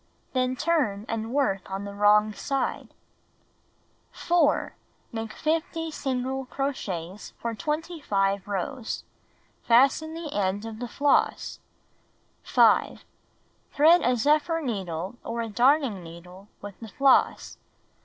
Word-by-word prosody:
Then 255 -1 +1
turn, 260 -10 0
and 225 0 -3
work 245 -10 0
on 195 +1 -4
the 200 - -7
wrong 210 +1 +4
side. 275 +5 -3 1.2
4. 335 -4 +1 0.4
Make 225 -1 -5
50 325 +3 -2
single 265 -2 -3
crochets 205 -10 -4
for 235 -1 -3
25 225 - -1
rows. 205 +4 -4 0.6
Fasten 275 +7 +3
the 330 -3 -6
end 200 +1 -1
of 225 -1 -7
the 245 - -4
floss. 285 +4 +1 0.8
5. - - +3 0.7
Thread 320 +4 +6
a 250 - +2
zephyr 300 +6 +2
needle 195 - -4
or 235 0 -3
a 225 - -5
darning 245 -2 +2
needle 180 +4 -12 0.2
with 205 -2 -9
the 225 - -8
floss. 270 +4 +2
235 Hz, 115 wpm, -26 LUFS, 205-290 Hz, 1.2 s, Thread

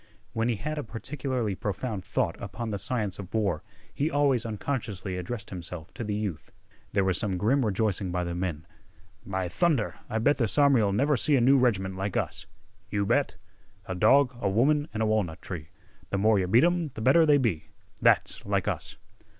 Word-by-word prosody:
When 115 0 0
he 120 - +1
had 150 +8 -4
a - - -3
particularly 125 -1 -3
profound 100 0 -3
thought 95 -2 -1
upon 110 +3 -5
the 100 - -3
science 100 -2 -2
of 100 -1 -8
war 100 -8 +1 0.3
he 145 +3 0
always 140 -6 +2
unconsciously 105 -4 -3
addressed 100 +4 -5
himself 90 -1 -6
to - - -5
the 105 -1 -2
youth. 105 -7 -4 0.4
There 100 - +2
was 95 -2 +1
some 95 -3 -1
grim 130 +9 +2
rejoicing 105 -3 0
by 90 0 -1
the 85 0 -3
men. 85 -3 -3 0.6
"By 95 -1 -2
thunder, 135 - +1
I 110 - -1
bet 145 +7 +2
this 115 0 0
army'll 135 -8 +5
never 140 +8 +2
see 145 +4 +2
another 125 0 +5
new 140 - +6
reg'ment 95 -7 +1
like 95 0 -2
us!" - - -2 0.4
"You 100 -1 0
bet!" - - +1 0.5
"A 95 - -4
dog, 125 +7 +4
a 100 - +1
woman, 145 +9 +2
an' 110 - -3
a - - +3
walnut 105 -7 0
tree 80 -5 -7 0.4
Th' 100 - +1
more 105 +1 +4
yeh 90 - 0
beat 115 +7 +5
'em, 175 -2 +2
th' 110 -4 -7
better 160 +6 +5
they 145 -1 +6
be! 90 - 0 0.4
That's - - +3
like - - -1
us." - - -3
110 Hz, 195 wpm, -27 LUFS, 95-130 Hz, 0.6 s, new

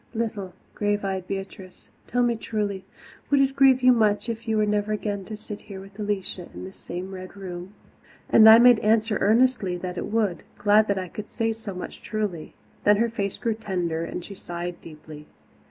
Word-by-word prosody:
"Little, 210 -5 -3 0.2
grave 205 -1 -1
eyed 190 -2 -3
Beatrice, 195 -1 -7 0.2
tell 245 +1 +1
me 240 -1 +2
truly, 205 -4 -3 0.4
would 285 - +4
it 270 0 +2
grieve 265 -2 +5
you 255 - +7
much 215 -1 +1
if 230 0 -5
you 220 -1 +1
were 215 - +3
never 210 0 0
again 205 -2 -3
to 215 +1 -7
sit 210 -1 -8
here 195 -2 -9
with 195 +2 -13
Alicia 195 -3 -3
in - - -7
this 190 +1 -10
same 185 +2 -7
Red 185 0 -9
Room?" 185 0 -8 0.5
And 220 0 +8
I 220 - +11
made 240 -1 +7
answer 215 0 +2
earnestly 220 -4 +3
that 180 0 -5
it - - -4
would, 210 -6 0 0.2
glad 210 +1 +4
that 200 - 0
I 185 -1 -3
could 210 +4 -8
say 225 -1 -1
so 220 -4 -8
much 180 - -7
truly. 205 -7 -4 0.3
Then 205 0 +5
her 230 +2 +2
face 200 -3 -3
grew 230 -2 -1
tender 180 -7 -2
and 175 - -5
she 200 - -9
sighed 175 -2 -6
deeply. 150 -1 -12
205 Hz, 200 wpm, -25 LUFS, 185-220 Hz, 0.5 s, I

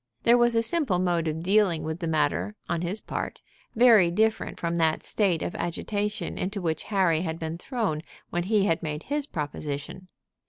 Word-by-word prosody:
There 235 - +6
was 240 -1 +4
a 230 - +3
simple 255 - +1
mode 175 -2 +1
of 160 +1 -3
dealing 190 -3 +3
with 160 +1 -4
the 170 - -3
matter 100 - 0
on 170 -1 -1
his 180 +5 -2
part, - - -5 0.4
very 225 -7 +6
different 220 +5 0
from 170 -1 -1
that 160 -1 +2
state 190 -6 0
of - - -3
agitation 205 +4 -3
into 200 +2 -2
which 160 -4 -2
Harry 185 -6 +2
had 165 -2 -3
been 165 0 -5
thrown 215 - -2 0.3
when 175 0 -1
he 205 0 +3
had 165 -3 +1
made 150 -2 -4
his 290 0 -1
proposition. 150 - -5
175 Hz, 185 wpm, -26 LUFS, 160-215 Hz, 0.4 s, There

